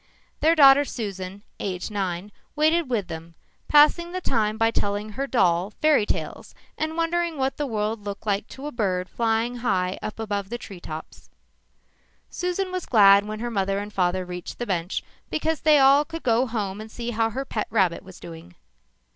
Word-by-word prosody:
Their 325 +2 +4
daughter 280 -2 +8
Susan, 200 -6 -6 0.2
aged 185 +1 -4
nine, 195 -1 -3 0.2
waited 315 0 +2
with 215 -7 -1
them, 165 0 -8 0.3
passing 305 +4 +5
the 370 - -2
time 220 -9 0
by 225 0 +3
telling 205 0 -1
her 270 +6 -4
doll 180 -7 +2
fairy 300 -9 +3
tales - - -4 0.2
and 315 +1 -3
wondering 335 -1 0
what 265 0 -1
the 295 - -2
world 215 -2 -2
looked 200 +1 -6
like 200 0 0
to 270 - -10
a 295 - -4
bird 185 -7 -1
flying 230 +4 0
high 190 -6 -1
up 215 - -6
over 205 -2 -2
a 240 - -2
tree 200 -6 -10
top. 155 -2 -6 1.3
Susan 360 +1 -2
was 365 -1 -4
glad 200 -3 +6
when 215 +1 -5
her 240 0 -3
mother 195 -2 0
and 205 +1 -5
father 185 -1 0
reached 180 0 -7
the 240 - -3
bench 180 -3 -2 0.3
because 315 0 -1
then 305 -1 +5
they - - +6
all 275 +2 +6
could 330 +2 -8
go 240 +2 +2
home 210 -3 -3
and 220 - -9
see 235 +1 -5
how 225 0 +1
her 265 +5 -4
pet 215 -4 -3
rabbit 190 -6 +1
was 185 -2 -13
doing. 165 - -11
220 Hz, 190 wpm, -24 LUFS, 195-275 Hz, 1.3 s, daughter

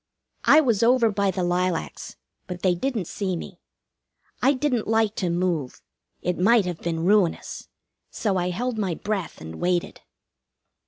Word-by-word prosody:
I 310 - +7
was 235 -8 +1
over 235 -1 +4
by 200 -1 +1
the 185 -1 -1
lilacs; 175 -1 -2 0.3
but 180 -2 -7
they 185 -2 +4
didn't 220 +1 -2
see 190 +2 -3
me. 175 +2 -8 0.8
I 270 +3 +4
didn't 255 -4 -1
like 220 -1 +2
to 180 - 0
move. 170 -6 -2 0.4
It 180 0 -1
might 215 +2 +4
have 175 -2 -4
been 165 -1 -2
ruinous, 195 -3 +1 0.4
so 205 -4 -1
I 180 -1 0
held 230 +5 -2
my 190 -5 -1
breath 200 -2 -4
and 80 +1 -8
waited. 175 -1 -1
190 Hz, 155 wpm, -24 LUFS, 175-225 Hz, 0.8 s, I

